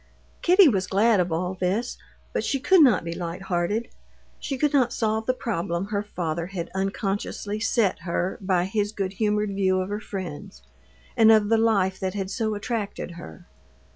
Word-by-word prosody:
Kitty 365 Hz, +1 st, +6 dB
was 190 Hz, -8 st, +1 dB
glad 205 Hz, +2 st, +3 dB
of 180 Hz, -1 st, 0 dB
all 180 Hz, +3 st, -1 dB
this, 190 Hz, +6 st, -2 dB, 0.3 s
but -, -, -1 dB
she 275 Hz, -, -1 dB
could 350 Hz, +6 st, +5 dB
not 245 Hz, -, +5 dB
be 170 Hz, 0 st, -4 dB
light 175 Hz, +1 st, -5 dB
hearted. 190 Hz, +5 st, -1 dB, 0.5 s
She 270 Hz, -, -4 dB
could 295 Hz, +2 st, +1 dB
not 255 Hz, -4 st, +3 dB
solve 220 Hz, -1 st, -1 dB
the 255 Hz, -, +3 dB
problem 170 Hz, -6 st, -2 dB
her 205 Hz, -1 st, -1 dB
father 170 Hz, -5 st, -3 dB
had 180 Hz, -3 st, -6 dB
unconsciously 195 Hz, +2 st, -2 dB
set 215 Hz, -3 st, +1 dB
her 180 Hz, +1 st, -2 dB
by 185 Hz, -2 st, +1 dB
his 205 Hz, +2 st, -1 dB
good 195 Hz, -2 st, -3 dB
humored 210 Hz, 0 st, 0 dB
view 190 Hz, -1 st, +1 dB
of 185 Hz, +1 st, -3 dB
her 205 Hz, +1 st, -3 dB
friends, 170 Hz, -, -7 dB, 0.5 s
and 225 Hz, 0 st, +6 dB
of 215 Hz, -2 st, +4 dB
the 225 Hz, -, +4 dB
life 200 Hz, -4 st, +2 dB
that 190 Hz, 0 st, -3 dB
had 195 Hz, -1 st, -3 dB
so 220 Hz, -2 st, -1 dB
attracted 205 Hz, -3 st, -4 dB
her. 80 Hz, -, -11 dB
200 Hz, 180 wpm, -25 LUFS, 185-220 Hz, 0.5 s, Kitty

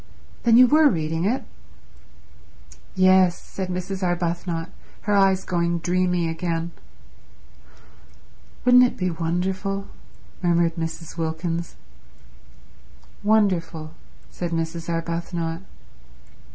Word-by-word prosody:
"Then 230 Hz, -1 st, +5 dB
you 255 Hz, -, +9 dB
were 300 Hz, +3 st, +5 dB
reading 160 Hz, -, -1 dB
it?" 245 Hz, +6 st, 0 dB, 1.5 s
"Yes," 185 Hz, -1 st, +5 dB
said 190 Hz, -1 st, -6 dB
Mrs. 185 Hz, +1 st, -4 dB
Arbuthnot, 175 Hz, -1 st, -2 dB, 0.3 s
her 210 Hz, -, -1 dB
eyes 195 Hz, -1 st, +4 dB
going 170 Hz, -1 st, 0 dB
dreamy 180 Hz, 0 st, 0 dB
again. 165 Hz, 0 st, -2 dB, 1.9 s
"Wouldn't 250 Hz, 0 st, +7 dB
it 250 Hz, -, +1 dB
be 185 Hz, -1 st, 0 dB
wonderful?" 190 Hz, +4 st, -2 dB, 0.5 s
murmured 170 Hz, -2 st, +2 dB
Mrs. 165 Hz, 0 st, -5 dB
Wilkins. 165 Hz, +1 st, -3 dB, 1.5 s
"Wonderful," 185 Hz, -7 st, +1 dB, 0.4 s
said 175 Hz, -, -4 dB
Mrs. 165 Hz, 0 st, -3 dB
Arbuthnot. 170 Hz, 0 st, -3 dB
175 Hz, 90 wpm, -23 LUFS, 165-190 Hz, 1.9 s, you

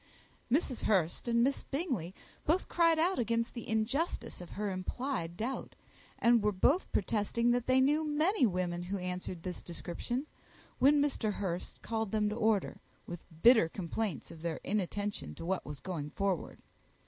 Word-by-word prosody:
Mrs. 270 Hz, -3 st, +1 dB
Hurst 185 Hz, 0 st, +1 dB
and 235 Hz, 0 st, +3 dB
Miss 275 Hz, +2 st, +1 dB
Bingley 255 Hz, -, -3 dB, 0.3 s
both 340 Hz, +5 st, +1 dB
cried 335 Hz, -2 st, +4 dB
out 345 Hz, +2 st, +2 dB
against 230 Hz, 0 st, 0 dB
the 235 Hz, -, -7 dB
injustice 220 Hz, -, -1 dB
of 175 Hz, -, -9 dB
her 205 Hz, -1 st, -1 dB
implied 185 Hz, -2 st, -3 dB
doubt, 240 Hz, +6 st, -4 dB, 0.4 s
and 235 Hz, -1 st, +5 dB
were 210 Hz, 0 st, +2 dB
both 275 Hz, -, +2 dB
protesting 225 Hz, +3 st, +1 dB
that 245 Hz, -1 st, 0 dB
they 260 Hz, 0 st, +5 dB
knew 295 Hz, +4 st, +3 dB
many 305 Hz, -, +3 dB
women 180 Hz, -2 st, -1 dB
who 185 Hz, +3 st, -3 dB
answered 180 Hz, -1 st, -4 dB
this 180 Hz, -1 st, -5 dB
description, 210 Hz, -, -4 dB, 0.5 s
when 285 Hz, +3 st, +6 dB
Mr. 240 Hz, -7 st, 0 dB
Hurst 180 Hz, -3 st, -4 dB
called 225 Hz, -2 st, -1 dB
them 210 Hz, -1 st, +2 dB
to 210 Hz, -, -3 dB
order, 220 Hz, -4 st, +1 dB, 0.2 s
with 175 Hz, -1 st, -7 dB, 0.2 s
bitter 230 Hz, -8 st, +7 dB
complaints 190 Hz, +1 st, -3 dB
of 160 Hz, -, -11 dB
their 165 Hz, -1 st, -2 dB
inattention 205 Hz, -, -2 dB
to -, -, -7 dB
what 190 Hz, +1 st, -1 dB
was 150 Hz, -1 st, -6 dB
going 160 Hz, -6 st, -4 dB
forward. 195 Hz, +1 st, -2 dB
215 Hz, 160 wpm, -32 LUFS, 180-260 Hz, 0.5 s, bitter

